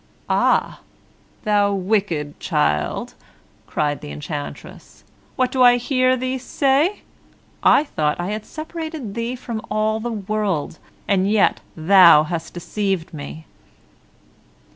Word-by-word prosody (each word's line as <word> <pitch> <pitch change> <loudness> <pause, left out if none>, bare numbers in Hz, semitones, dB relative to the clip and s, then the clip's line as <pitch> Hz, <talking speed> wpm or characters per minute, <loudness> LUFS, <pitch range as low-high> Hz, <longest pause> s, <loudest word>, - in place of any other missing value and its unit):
"Ah! - - +2 0.7
you 205 -1 +2
wicked 185 -7 -1
child," 75 - -1 0.5
cried 145 -1 -1
the - - -8
enchantress, 75 0 -8 0.3
"what 255 -1 +1
do 260 - 0
I 245 -1 +7
hear 255 +1 +1
you 255 +1 -2
say! 280 +8 +1 0.6
I - - +5
thought 150 - -1
I 175 +3 -2
had 215 0 -4
separated 315 -7 -7
you 235 +2 -3
from 230 -3 -5
all 215 +1 0
the 240 +2 -4
world, 200 -7 -2 0.3
and 195 -1 +2
yet 210 -1 +3 0.2
you 160 - -8
have 170 -3 +6
deceived 190 -1 -3
me!" 155 +1 -8
205 Hz, 120 wpm, -21 LUFS, 165-245 Hz, 0.7 s, I